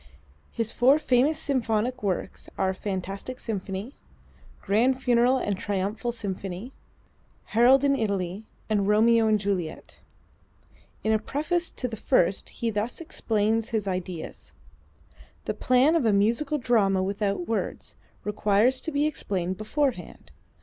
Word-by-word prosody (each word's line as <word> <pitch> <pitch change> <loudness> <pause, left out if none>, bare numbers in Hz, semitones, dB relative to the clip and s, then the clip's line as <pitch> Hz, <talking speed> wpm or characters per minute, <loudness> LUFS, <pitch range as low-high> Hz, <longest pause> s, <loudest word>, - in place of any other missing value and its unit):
His 230 -1 0
four 265 +4 +5
famous 280 +1 +2
symphonic 250 -2 -1
works 190 -3 -3
are: 190 -1 +1
"Fantastic 195 +5 -5
Symphony," 200 +2 -5 0.7
"Grand 245 +6 +2
Funeral 245 0 +3
and 205 -5 -1
Triumphal 205 +4 -2
Symphony," 200 0 -5 0.8
"Harold 250 +4 +6
in 280 -1 +3
Italy" 200 -3 -2 0.2
and 205 -2 +1
"Romeo 225 +2 +4
and 215 -1 +3
Juliet." 190 -5 -4 1.0
In 220 - +1
a 215 - +3
preface 315 +9 -1
to 250 - -4
the 225 -2 -6
first 185 -1 +1
he 230 -1 -3
thus 215 +3 -3
explains 225 -8 0
his 215 -3 -1
ideas: 180 -3 -5 0.9
"The - - -1
plan 255 +5 +3
of 330 -4 +2
a 215 - +3
musical 235 +9 +2
drama 205 -7 +2
without 200 -2 -2
words, 225 - -3 0.3
requires 210 +5 +2
to 325 - -3
be 290 0 +1
explained 190 - -2
beforehand. 265 +4 -3
220 Hz, 130 wpm, -26 LUFS, 200-255 Hz, 1.0 s, Harold